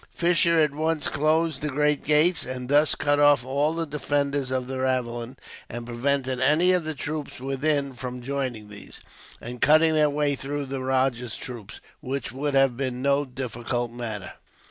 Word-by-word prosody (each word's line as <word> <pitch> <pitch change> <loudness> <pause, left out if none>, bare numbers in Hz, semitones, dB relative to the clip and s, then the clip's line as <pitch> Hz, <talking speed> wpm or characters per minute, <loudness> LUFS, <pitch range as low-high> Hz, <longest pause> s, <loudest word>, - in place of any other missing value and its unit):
Fisher 170 -1 +2
at 150 -2 +2
once 155 +1 0
closed 155 0 +1
the 150 - -1
great 150 +1 +1
gates, 155 +4 +3
and 125 0 -5
thus 145 +2 +4
cut 145 0 +1
off 145 -4 +5
all 145 +4 0
the 165 0 -1
defenders 145 -2 -1
of 130 -1 -1
the 130 +1 -5
ravelin, 125 -1 -2 0.3
and 120 0 -6
prevented 130 +2 -1
any 155 +7 +4
of 180 -2 +2
the 155 -1 -3
troops 150 0 -5
within 140 +1 0
from 125 0 -6
joining 130 -5 -3
these, 105 -1 -10 0.4
and 120 +1 -8
cutting 160 +1 +5
their 155 -1 +4
way 145 -1 0
through 140 +1 -4
the 135 0 -5
rajah's 130 -3 0
troops, 115 -5 -8 0.2
which 135 -1 -4
would 140 +2 -2
have 135 -2 +4
been 130 -1 -3
no 140 +1 +2
difficult 120 -2 -4
matter. 115 -5 -6
140 Hz, 170 wpm, -25 LUFS, 125-150 Hz, 0.4 s, off